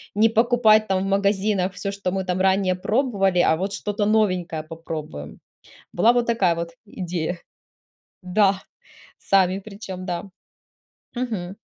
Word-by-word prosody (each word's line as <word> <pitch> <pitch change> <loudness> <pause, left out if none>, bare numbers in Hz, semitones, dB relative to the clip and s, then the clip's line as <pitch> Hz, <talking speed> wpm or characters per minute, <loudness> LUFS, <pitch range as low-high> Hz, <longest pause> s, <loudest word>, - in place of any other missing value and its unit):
не 220 +2 +4
покупать 225 -1 +4
там 190 0 0
в - - -3
магазинах 195 -1 +1
всё, 195 +2 -4
что 200 -2 -3
мы 190 0 -2
там 180 0 -1
ранее 190 -1 +2
пробовали, 195 -3 +1
а 160 - +4
вот 195 +4 -3
что-то 205 0 -2
новенькое 185 -7 +1
попробуем". 155 - -7 0.6
Была 220 +7 +5
вот 245 -1 +1
такая 200 -7 +2
вот 170 0 -4 0.2
идея. 175 -3 -4 0.9
Да, 195 +1 +2 0.6
сами 190 -1 +2
причем, 195 -3 -8
да. 175 +1 -3 0.9
Мгм. 210 -7 -3
195 Hz, 135 wpm, -23 LUFS, 180-215 Hz, 0.9 s, Была